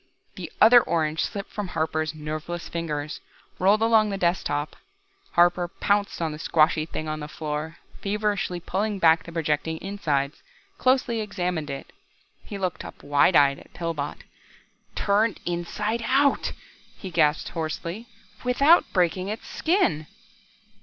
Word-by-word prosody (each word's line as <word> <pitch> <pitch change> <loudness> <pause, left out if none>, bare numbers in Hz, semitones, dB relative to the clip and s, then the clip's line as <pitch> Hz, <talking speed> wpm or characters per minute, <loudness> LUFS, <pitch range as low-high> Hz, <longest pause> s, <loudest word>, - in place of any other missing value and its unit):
The - - -8
other 240 +2 +8
orange 160 -4 0
slipped 200 -1 -5
from 210 -2 -4
Harper's 155 -2 -2
nerveless 155 +3 -5
fingers, 155 -3 -4 0.4
rolled 205 +4 +4
along 220 -2 +4
the 195 - -2
desk 175 -1 +1
top. 145 +1 -2 0.6
Harper 175 0 +4
pounced 200 0 0
on 160 - -1
the 150 - -7
squashy 155 -1 +2
thing 155 -1 -5
on 155 0 -3
the 150 - -6
floor, 155 +1 -5 0.2
feverishly 205 -3 -1
pushed 200 +4 -2
back 165 -2 +5
the 170 - -9
projecting 160 -1 -1
insides, 150 -7 -2 0.4
closely 255 -3 +2
examined 180 -7 -3
it. 140 0 -7 0.5
He 205 - -7
looked 185 -3 -3
up - - -11
wide 145 +5 +3
eyed 140 -1 +5
at - - -19
Pillbot. 165 -4 -4 0.7
"Turned 210 +2 +1
inside 210 +6 -2
out," 275 +2 +2 0.4
he 190 - -7
gasped 150 -2 +2
hoarsely, 170 +6 -4 0.4
"without 280 +7 +4
breaking 185 0 +1
its 215 +3 -5
skin!" 320 - +1
175 Hz, 140 wpm, -25 LUFS, 155-205 Hz, 0.7 s, other